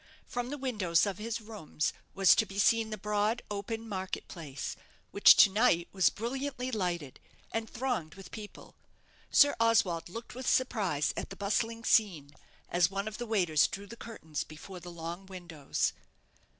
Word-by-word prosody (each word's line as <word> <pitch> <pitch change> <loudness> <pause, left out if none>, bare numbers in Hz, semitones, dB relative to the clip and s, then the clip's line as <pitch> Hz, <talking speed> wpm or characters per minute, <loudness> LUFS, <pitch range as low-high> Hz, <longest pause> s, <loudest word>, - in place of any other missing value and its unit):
From 245 0 -4
the 290 - -4
windows 210 - +1
of 200 -2 -3
his 230 +2 -3
rooms 210 -9 -3 0.2
was 195 -1 +7
to 220 - +2
be 195 - -9
seen 225 +2 +3
the 215 - -4
broad, 210 +3 0
open 225 +3 -4
market 190 -3 -4
place, 145 -6 -6 0.4
which 200 - +8
to 200 - +7
night 200 -5 +3
was 190 -2 +4
brilliantly 255 +3 -4
lighted, 175 - -3 0.3
and 225 -1 -2
thronged 230 -11 -3
with 195 -1 -12
people. 210 -2 -10 0.6
Sir 285 -1 +6
Oswald 200 -8 +2
looked 230 +6 -8
with 255 0 -2
surprise 195 - +1
at - - -4
the - - -8
bustling 225 +3 -1
scene, 175 -12 +2 0.4
as 175 -1 +3
one 195 +1 -3
of 215 +1 -6
the 240 - -4
waiters 180 -9 +3
drew 200 +1 -7
the 215 +4 -10
curtains 160 -11 -6
before 180 +4 -10
the 175 +1 -10
long 170 +2 -7
windows. 175 -6 -2
200 Hz, 165 wpm, -31 LUFS, 175-230 Hz, 0.6 s, which